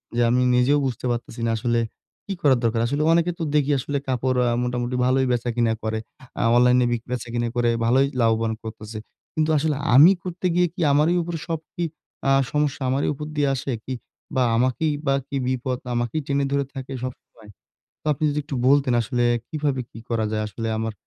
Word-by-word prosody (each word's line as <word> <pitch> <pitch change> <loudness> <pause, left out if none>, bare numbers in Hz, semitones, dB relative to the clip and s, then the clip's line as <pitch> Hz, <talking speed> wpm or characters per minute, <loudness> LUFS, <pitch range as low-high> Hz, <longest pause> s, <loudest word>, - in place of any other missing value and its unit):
যে, 120 - +2
আমি 125 +1 +3
নিজেও 125 +4 +4
বুঝতে 130 -1 -3
পারতেছি 120 0 -5
না 115 - +1
আসলে 120 +1 +1 0.5
কি 200 - -3
করার 135 -4 +4
দরকার। 115 0 +1
আসলে 145 +4 -1
অনেকের 170 +1 +2
তো 165 - -1
দেখি 145 -1 +3
আসলে 140 +2 -2
কাপড় 130 0 0
আ - - +1
মোটামুটি 125 0 -2
ভালোই 130 +1 +3
বেচা 120 0 0
কিনা 120 -2 +2
করে, 110 0 -1 0.4
আ - - +2
অনলাইনে 125 0 +5
বিক 120 -1 -1
বেচা-কিনা 120 -1 -2
করে 120 -1 +2 0.2
ভালোই 130 +4 +4
লাভবান 115 0 +2
করতেছে। 110 0 -7 0.3
কিন্তু 155 0 +1
আসলে 150 0 +1 0.2
আমি 155 +8 +9
করতে 180 0 -5
গিয়ে 180 0 +4
কি 180 - -6
আমারই 150 +5 +3
উপর 170 0 -4
সব 165 -2 -2
কি 175 - -3 0.5
আ - - +5 0.2
সমস্যা 150 -2 0
আমারই 135 +2 +1
উপর 150 +2 -6
দিয়ে 145 -2 +2
আসে 135 +1 -3
কি? 130 - -4 0.4
বা, 130 - +3
আমাকেই 130 +6 +1
বা 135 - +3
কি 140 - -5
বিপদ 130 0 -1 0.2
আমাকেই 120 +6 -1
টেনে 140 0 +1
ধরে 140 -1 +1
থাকে 135 -1 -7
সবসময়? 115 -4 -9 0.5
তো - - -16
আপনি 150 +2 -3
যদি 145 - -2
একটু 140 -2 -4
বলতেন 140 -3 +4
আসলে 120 +2 0 0.2
কীভাবে 145 -4 -1
কি - - -11
করা 115 -2 0
যায়? 110 0 0
আসলে 115 +3 -4
আমার 110 0 -2
130 Hz, 195 wpm, -23 LUFS, 120-145 Hz, 0.5 s, আমি